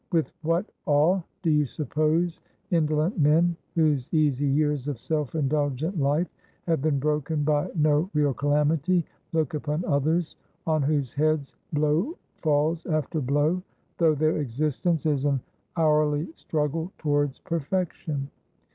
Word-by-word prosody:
"With 165 -3 +1
what 165 +4 +1 0.2
awe 155 +6 +4 0.2
do 165 - +3
you 150 -1 +3
suppose 155 +5 0 0.3
indolent 155 +2 +1
men, 165 +4 +4 0.2
whose 150 -6 +1
easy 145 -3 +2
years 145 -1 +1
of 145 -4 -2
self 150 +2 -2
indulgent 150 +3 0
life 145 +5 +2 0.4
have 165 -5 +1
been 150 -1 +1
broken 150 +1 0
by 145 0 +1
no 155 +2 +2
real 145 -2 +3
calamity, 150 +5 +2 0.3
look 160 -3 0
upon 150 +2 -2
others 155 +3 0 0.3
on 155 -2 +2
whose 140 -3 0
heads 150 -1 0 0.2
blow 155 - +1 0.2
falls 155 -1 +1
after 155 0 -1
blow, 145 +7 +1 0.4
though 160 -3 +4
their 155 +2 +1
existence 150 +4 -1
is 145 -3 +1
an 140 -2 +2 0.4
hourly 150 -1 +2
struggle 160 +3 -2
towards 145 -3 0
perfection? 165 -4 -3
150 Hz, 130 wpm, -26 LUFS, 145-160 Hz, 0.4 s, awe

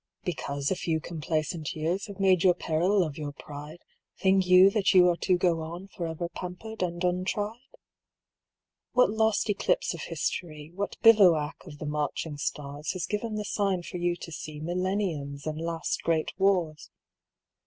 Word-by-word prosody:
"Because 140 -4 -2
a - - +2
few 165 -3 -1
complacent 155 -1 -3
years 170 +6 -1
Have 200 -1 -10
made 185 -3 +4
your 180 -2 +5
peril 180 +4 +2
of 155 -2 -5
your 145 -1 -4
pride, 150 +4 -10 0.3
Think 190 -1 +3
you 185 +2 +8
that 200 -2 +2
you 180 -1 +8
are 175 - +2
to 185 0 +2
go 175 -2 +1
on 170 +4 -7
Forever 170 -2 -4
pampered 180 +5 -7
and 175 0 -2
untried? 190 +5 -1 1.3
"What 250 -5 +4
lost 220 +1 +2
eclipse - - +1
of - - -7
history, 155 -3 -4
What 200 +2 -4
bivouac 180 -10 +6
of 150 -3 -10
the 155 - -6
marching 150 +1 -2
stars, 145 +2 -4
Has 180 -3 -3
given 215 +3 -3
the 210 0 -3
sign 195 -4 0
for 180 - -6
you 175 0 0
to 175 - -9
see 155 -1 -7
Millenniums 170 -5 -2
and 155 0 -3
last 165 0 -2
great 160 -2 0
wars? 180 -5 +1
175 Hz, 165 wpm, -28 LUFS, 155-195 Hz, 1.3 s, you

